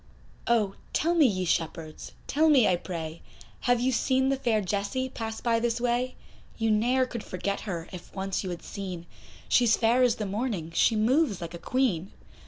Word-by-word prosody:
Oh! 215 -5 +2 0.2
tell 335 +2 +2
me 320 -5 +5
ye 185 -5 -1
shepherds, 165 -1 -3
tell 315 +3 +3
me 270 -7 +6
I 180 - +3
pray, 165 -2 -6 0.4
Have 245 -1 +2
you 255 +2 +1
seen 260 +2 +2
the 275 - +2
fair 235 -5 +1
Jessie 205 +7 -2
pass 225 -2 -5
by 230 -1 +2
this 235 0 0
way? 245 +1 0 0.4
You 225 -1 +1
ne'er 245 +5 +3
could 235 -3 -6
forget 200 +2 -3
her, 170 -2 -4
if 180 - -9
once 195 0 -2
you 190 - -4
had 175 -1 -6
seen, 185 -4 -6 0.4
She's 240 -3 +4
fair 235 +3 +3
as 245 -2 +4
the 215 - -3
morning, 200 -5 -3
she 220 +6 +3
moves 230 - +2
like 170 0 -6
a 170 - -7
Queen. 200 -5 0
220 Hz, 190 wpm, -27 LUFS, 185-250 Hz, 0.4 s, me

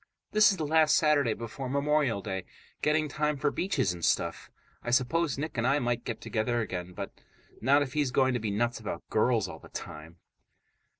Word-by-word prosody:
This 215 -1 +6
is 195 - 0
the 155 - -2
last 155 0 +4
Saturday 145 -7 +3
before 120 +3 -6
Memorial 140 -6 +1
Day. 95 -3 -4 0.4
Getting 155 0 +2
time 150 0 -1
for 145 +1 +1
beaches 175 - 0
and 85 -1 -9
stuff. 85 0 0 0.3
I - - -5
suppose 135 +5 +1
Nick 145 -3 -3
and 120 - +1
I 135 +2 +3
might 120 -3 -1
get 120 - -4
together 120 +1 -1
again, 90 -5 -4
but - - -6 0.5
not 140 +4 +4
if 130 -2 -7
he's 150 -3 +1
going 130 0 +2
to 120 - 0
be 110 -1 -2
nuts 120 +4 0
about 105 -6 -6
girls 110 -1 +2
all - - -9
the - - -15
time. 80 +3 -8
125 Hz, 195 wpm, -29 LUFS, 110-150 Hz, 0.5 s, This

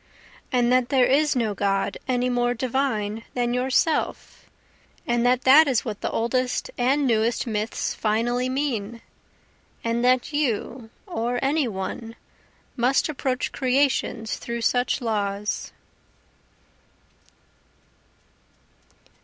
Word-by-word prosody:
And 245 -2 +2
that 255 -1 +2
there 260 -2 +4
is 290 +3 +2
no 225 -4 0
God 195 0 0
any 250 -1 +1
more 245 0 +1
divine 230 -4 -1
than 240 -1 0
Yourself? 260 +5 -1 0.6
And 240 0 +1
that 250 0 +2
that 290 +4 +7
is 255 -4 +1
what 215 -4 -5
the - - -1
oldest 250 +2 -1
and 270 +4 +1
newest 230 -1 +1
myths 220 -1 -2
finally 240 +4 0
mean? 235 -5 -2 0.8
And 230 +1 -1
that 255 +3 +2
you 245 -4 -2 0.2
or 235 +2 -2
any 285 0 +1
one 225 +3 -5 0.6
must 255 +5 +2
approach 260 -3 -2
creations 260 -4 0
through 235 0 -5
such 245 +3 +1
laws? 210 -3 -2
245 Hz, 110 wpm, -24 LUFS, 225-260 Hz, 0.8 s, that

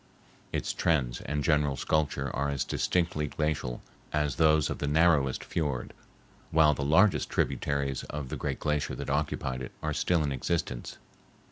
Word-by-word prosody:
Its - - -2
trends 65 -8 +1
and 75 0 -1
general 75 -2 +2
sculpture 70 -3 0
are 70 +1 0
as 70 -2 -1
distinctly 85 -4 0
glacial 75 -5 -2 0.3
as 75 -3 0
those 80 -2 +4
of - - -4
the 75 - -1
narrowest 75 -3 +3
fiord, 70 -7 -2 0.6
while 80 -1 +5
the 70 - -4
largest 80 +8 +4
tributaries 70 -2 0
of 75 -3 -5
the - - -3
great - - -3
glacier 75 -1 -1
that - - -4
occupied 70 -3 -1
it 65 - -7
are - - -1
still 85 -3 +1
in 70 - -1
existence. 65 -2 -2
75 Hz, 155 wpm, -29 LUFS, 70-80 Hz, 0.6 s, while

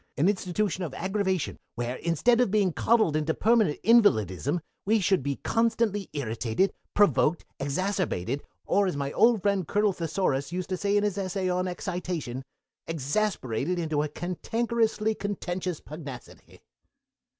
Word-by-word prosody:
"An 150 - +3
institution 190 0 0
of 150 -6 -5
aggravation, 190 -4 -1 0.2
where, 120 +1 -3
instead 225 - +2
of 245 - +2
being 200 -4 +2
coddled 220 -8 +3
into 155 +1 0
permanent 220 -9 +3
invalidism, 175 - +3 0.2
we 220 +2 +3
should 190 -2 +2
be 140 +1 -2
constantly 225 -3 +1
irritated, 120 - -1 0.2
provoked, 185 -5 +3
exacerbated, 145 - -1 0.2
or, 200 -1 +2
as 180 - -2
my 140 0 -2
old 230 -4 +4
friend 200 -5 +1
Colonel 205 -1 +2
Thesaurus 165 -5 -1
says 185 +4 -4
in 205 +1 +3
his 205 -1 0
Essay 190 -1 -1
on 180 +1 0
Excitation, 175 -8 -4 0.4
exasperated 160 - -1
into 155 -3 0
a 150 - 0
cantankerously 220 +6 -1
contentious 185 -4 -3
pugnacity!" 145 -5 -10
185 Hz, 130 wpm, -27 LUFS, 150-205 Hz, 0.4 s, old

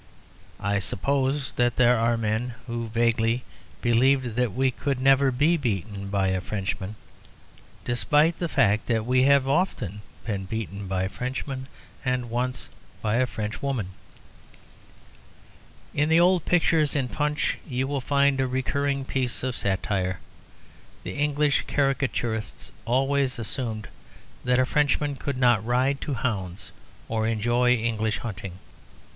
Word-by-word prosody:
I 100 0 0
suppose 135 +7 0
that 120 -1 +2
there 125 -1 +5
are 115 0 +2
men 115 +2 -1
who 115 -1 -4
vaguely 115 +1 +1 0.4
believe 125 +1 +3
that 125 -1 +1
we 130 +3 +1
could 135 +1 -2
never 135 +1 +5
be 145 +7 +3
beaten 100 - -3
by 100 -1 +1
a 95 -1 0
Frenchman, 100 +1 -3 0.9
despite 150 +7 +2
the 170 - -1
fact 105 -4 +2
that 110 -2 +1
we 130 +1 +3
have 140 -1 +4
often 130 - 0 0.2
been 100 -4 -2
beaten 100 -1 -5
by 95 0 0
Frenchmen, 130 +5 -4 0.4
and 125 -3 -1
once 125 +2 -2 0.4
by 110 +1 +1
a 130 0 +2
Frenchwoman. 110 0 -3 2.0
In 145 +2 +1
the 160 +1 +5
old 180 -1 +4
pictures 165 -4 +3
in 135 -3 +1
Punch 150 +3 -1
you 130 -2 -1
will 140 -1 -2
find 140 0 +2
a 130 - +1
recurring 135 +2 -1
piece 130 -2 -1
of 130 -1 -1
satire. 95 -1 -1 0.8
The 90 - -5
English 145 +1 +1
caricaturists 125 -6 -1
always 135 +2 +1
assumed 110 -1 -4 0.6
that 125 0 +3
a 130 - +4
Frenchman 145 +1 +1
could 140 -1 -3
not 120 -5 +4
ride 130 +4 +1
to 140 - -2
hounds 95 -7 -3 0.4
or 110 -1 0
enjoy 120 +3 +2
English 110 -2 -1
hunting. 100 -3 -6
125 Hz, 135 wpm, -26 LUFS, 110-135 Hz, 2.0 s, there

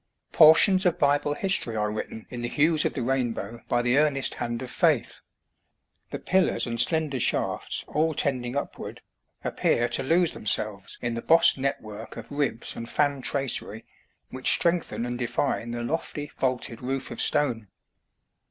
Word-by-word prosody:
" - - -53
Portions 175 +5 +6
of 175 0 +1
Bible 145 -1 +1
history 190 - -1
are 105 -1 -1
written 110 +1 -6
in 120 -1 -5
the 120 - -2
hues 155 +3 +2
of - - 0
the 125 - -3
rainbow 120 -3 -2
by 120 - +1
the 120 +3 +3
earnest 145 -3 +1
hand 120 +1 -4
of 125 - -7
faith." - - +1 0.9
The - - -4
pillars 190 -1 +1
and 115 -1 -4
slender 155 -3 +2
shafts, - - 0
all 155 +1 0
tending 125 -3 -1
upward, 145 - -6 0.4
appear 120 - +1
to 120 - -1
lose 165 +5 +2
themselves 105 -2 -3
in 120 -1 -1
the 115 - -4
bossed 165 -1 +5
network 110 -5 -5
of 115 +3 -9
ribs 145 -5 -2
and 115 0 -7
fan 145 -2 0
tracery 125 -4 -3 0.5
which 130 0 +1
strengthen 170 -8 0
and 120 0 -4
define 120 0 -1
the 120 0 -4
lofty, 145 +1 -4
vaulted 125 -3 -2
roof 135 +1 -3
of - - -3
stone. 125 -8 +2
130 Hz, 160 wpm, -26 LUFS, 120-150 Hz, 0.9 s, Portions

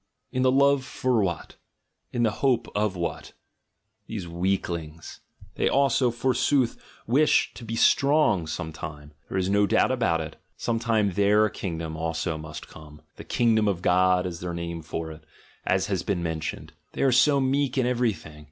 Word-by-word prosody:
In 130 - -1
the 130 0 +4
love 140 0 +4
for 130 -3 0
what? 90 -4 -3 0.5
In 120 - 0
the 110 - +3
hope 130 -4 +2
of 105 -2 0
what? 85 -3 -4 0.7
These 100 -6 -5
weaklings! 85 -3 -3 0.2
— - - -22
they - - +2
also, 135 -2 +3
forsooth, 125 +1 +1 0.2
wish 140 +7 +3
to - - -11
be 115 0 -4
strong 140 - +3
some 80 0 -5
time; 75 -1 -8 0.2
there - - -2
is 95 -1 0
no 100 +1 +3
doubt - - +3
about 115 -10 +1
it. 80 -1 -6 0.2
some 115 -1 -1
time 110 -3 +1
their 100 +3 +3
kingdom 80 -6 -5
also 80 0 -2
must 75 0 -8
come 75 0 -14
— - - -46
"the - - -8
kingdom 110 -3 +2
of 90 -3 -1
God" 90 0 +3
is 85 -2 -5
their 85 -1 -4
name 85 -1 -5
for 80 +1 -5
it, 80 0 -12 0.4
as 95 0 +2
has 95 -4 -1
been 90 -2 -2
mentioned: 80 -2 -4
— - - -46
they - - -1
are 135 - +4
so 140 +3 +4
meek 135 0 0
in 130 - +2
everything! 115 -11 -1
100 Hz, 180 wpm, -26 LUFS, 85-120 Hz, 0.7 s, the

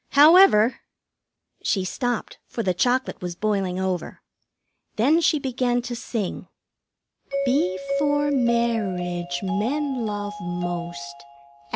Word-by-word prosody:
However 290 - +6 0.4
" - - -59
She 190 -2 0
stopped, 245 +4 -3
for 230 - -4
the 185 - +1
chocolate 250 +8 0
was 175 -1 -4
boiling 195 -2 -1
over; 185 -2 -3 0.7
then 290 +10 +3
she 320 - +3
began 255 -3 0
to 245 0 -5
sing: 225 -4 -4 1.0
"Before 275 +4 +1
marriage, 195 -9 0
men 245 +5 -1
love 205 0 -4
most. 170 -5 -5
220 Hz, 100 wpm, -24 LUFS, 180-260 Hz, 1.0 s, However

